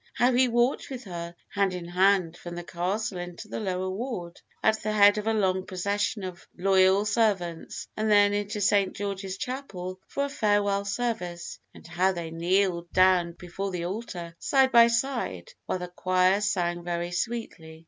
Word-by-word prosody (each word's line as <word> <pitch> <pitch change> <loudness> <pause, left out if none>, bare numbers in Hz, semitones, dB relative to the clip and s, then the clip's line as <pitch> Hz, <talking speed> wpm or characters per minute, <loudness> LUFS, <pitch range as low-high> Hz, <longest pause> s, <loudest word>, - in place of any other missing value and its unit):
How 245 +1 +3
he 255 +1 +4
walked 240 +2 +1
with 260 -2 -6
her, 170 -3 -7
hand 200 -2 0
in 175 -1 -6
hand, 180 -1 +3
from 175 0 -8
the 175 - -5
Castle 185 +3 -2
into 175 +4 -7
the - - -5
lower 185 -3 -2
ward, 185 -4 -5 0.2
at 220 0 +3
the 215 - -1
head 205 0 +6
of 210 - -5
a 225 - +2
long 190 -3 +1
procession 200 +3 -1
of 185 -1 -7
loyal 190 +1 +4
servants, 200 -7 -1
and 215 0 -1
then 205 -1 +5
into 205 0 -2
St. 200 -1 +2
George's 195 -1 -4
Chapel 190 -8 -5
for 280 - -1
a - - -4
farewell 205 -6 +1
service, 200 -5 -3 0.2
and - - -14
how 180 +3 +1
they 170 -2 -5
kneeled 175 +1 0
down 185 -2 +4
before 180 +3 -5
the 180 -2 -3
altar, 180 -4 -5
side 265 -1 +3
by 235 -2 +8
side, 245 - -1 0.2
while - - 0
the 180 0 -5
choir 185 +2 +2
sang 175 -4 0
very 175 0 -3
sweetly. 175 -6 -4
195 Hz, 175 wpm, -27 LUFS, 175-215 Hz, 0.2 s, by